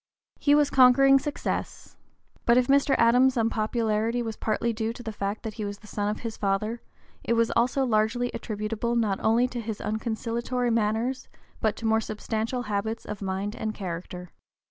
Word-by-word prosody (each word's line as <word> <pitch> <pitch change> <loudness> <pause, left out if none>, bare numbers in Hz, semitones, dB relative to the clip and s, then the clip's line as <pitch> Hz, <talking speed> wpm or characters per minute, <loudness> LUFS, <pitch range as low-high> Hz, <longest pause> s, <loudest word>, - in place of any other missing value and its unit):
He 290 0 +4
was 295 -1 +3
conquering 270 +1 +6
success. 290 +1 -4 0.5
But 235 0 +6
if 250 - +4
Mr. 275 +1 +3
Adams's 250 +3 +4
unpopularity 225 +1 0
was 225 -1 -4
partly 230 +2 -1
due 220 +1 -2
to 245 - -10
the 225 - -4
fact 205 +1 -4
that 220 -2 -4
he 215 - -5
was 205 0 -4
the 210 - -18
son 205 -1 -2
of 210 - -4
his 230 -2 -5
father, 215 +4 -1 0.4
it 235 - +1
was 230 0 +2
also 255 +3 +2
largely 230 +2 +1
attributable 220 +2 -3
not 215 -5 +1
only 230 +3 +3
to 245 -1 -4
his 220 -2 -4
unconciliatory 235 +2 -2
manners 225 +4 0 0.3
but 220 -1 +1
to 225 - -7
more 220 0 +3
substantial 220 +3 -3
habits 215 +1 -3
of 210 -1 -6
mind 195 +2 -3
and 215 -1 -4
character. 180 -1 -6
225 Hz, 175 wpm, -26 LUFS, 215-245 Hz, 0.5 s, conquering